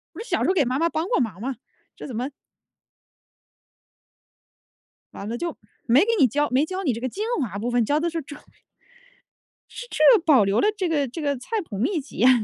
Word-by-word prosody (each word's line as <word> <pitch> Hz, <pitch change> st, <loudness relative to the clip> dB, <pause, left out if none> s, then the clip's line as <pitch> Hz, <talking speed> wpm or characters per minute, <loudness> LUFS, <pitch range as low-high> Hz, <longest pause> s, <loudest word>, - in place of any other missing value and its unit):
不 -, -, -8 dB
是 460 Hz, -, -7 dB
小 -, -, 0 dB
时 -, -, +1 dB
候 375 Hz, -, +3 dB
给 310 Hz, -7 st, +3 dB
妈 255 Hz, +3 st, -1 dB
妈 335 Hz, -, +2 dB
帮 325 Hz, 0 st, -2 dB
过 -, -, +2 dB
忙 220 Hz, -8 st, -2 dB
吗？ 260 Hz, +3 st, -3 dB, 0.4 s
这 -, -, -8 dB
怎 255 Hz, -, -7 dB
么 250 Hz, +4 st, -2 dB, 2.9 s
完 200 Hz, -, -7 dB
了 235 Hz, -, -3 dB
就 340 Hz, +2 st, -4 dB, 0.3 s
没 245 Hz, +4 st, +5 dB
给 410 Hz, -, +2 dB
你 270 Hz, -, +6 dB
教 290 Hz, +5 st, 0 dB
没 265 Hz, +4 st, +3 dB
教 375 Hz, +3 st, -4 dB
你 280 Hz, -9 st, +1 dB
这 230 Hz, -, -5 dB
个 255 Hz, -, -2 dB
精 410 Hz, -, -4 dB, 0.2 s
华 205 Hz, -7 st, -3 dB
部 235 Hz, +3 st, -2 dB
分， 240 Hz, -1 st, +2 dB
教 290 Hz, +7 st, +1 dB
的 340 Hz, +1 st, 0 dB
是 330 Hz, -, -3 dB
这 290 Hz, +2 st, -10 dB, 1.3 s
是 485 Hz, -, -9 dB
这 385 Hz, +7 st, +6 dB
保 280 Hz, -10 st, +5 dB
留 195 Hz, +2 st, +1 dB
了 415 Hz, -, +3 dB
这 375 Hz, -3 st, 0 dB
个 290 Hz, -4 st, +1 dB
这 265 Hz, +7 st, -7 dB
个 285 Hz, -2 st, -1 dB
菜 425 Hz, -, -3 dB
谱 200 Hz, -, -6 dB
秘 310 Hz, -, 0 dB
籍 270 Hz, -, -14 dB
呀！ 250 Hz, -, +5 dB
280 Hz, 235 characters per minute, -24 LUFS, 245-335 Hz, 2.9 s, 你